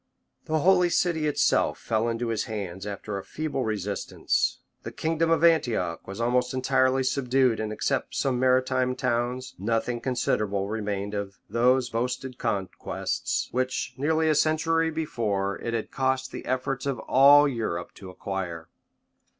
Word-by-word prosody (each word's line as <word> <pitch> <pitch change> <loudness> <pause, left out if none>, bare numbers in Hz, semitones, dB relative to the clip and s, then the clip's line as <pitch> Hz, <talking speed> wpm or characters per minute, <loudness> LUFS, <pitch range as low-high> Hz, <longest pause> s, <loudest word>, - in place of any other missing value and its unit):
} - - -46
The 155 -1 0
holy 180 0 +4
city 165 -3 +1
itself 150 - +2
fell 115 +1 -1
into 115 +1 -2
his 115 -2 -1
hands 100 -3 -5
after 100 0 -5
a - - -9
feeble 155 -4 -3
resistance; 105 -3 -1 0.2
the - - -7
kingdom 165 +1 0
of 165 -1 +2
Antioch 120 - +2
was 95 +2 -7
almost 125 +2 +1
entirely 130 0 +2
subdued 130 -2 +2
and 110 -1 -2
except 110 - -2
some 130 -3 0
maritime 130 0 +2
towns, 125 +1 -1
nothing 115 +3 -1
considerable 105 -6 0
remained 105 -1 -3
of 100 -1 -4
thope 125 +2 +3
boasted 125 +2 -3
conquests, 100 -6 -2
which, 130 0 -1
near 155 +5 +1
a 160 -1 +3
century 160 +2 +2
before, 105 -11 -2
it 115 0 -3
had 115 - -4
cost 130 0 0
the - - -7
efforts 130 +1 -2
of 135 -2 -1
all 145 +2 +6
Europe 110 -10 -3
to 95 - -11
acquire. 90 -3 -5
125 Hz, 150 wpm, -26 LUFS, 105-135 Hz, 0.2 s, all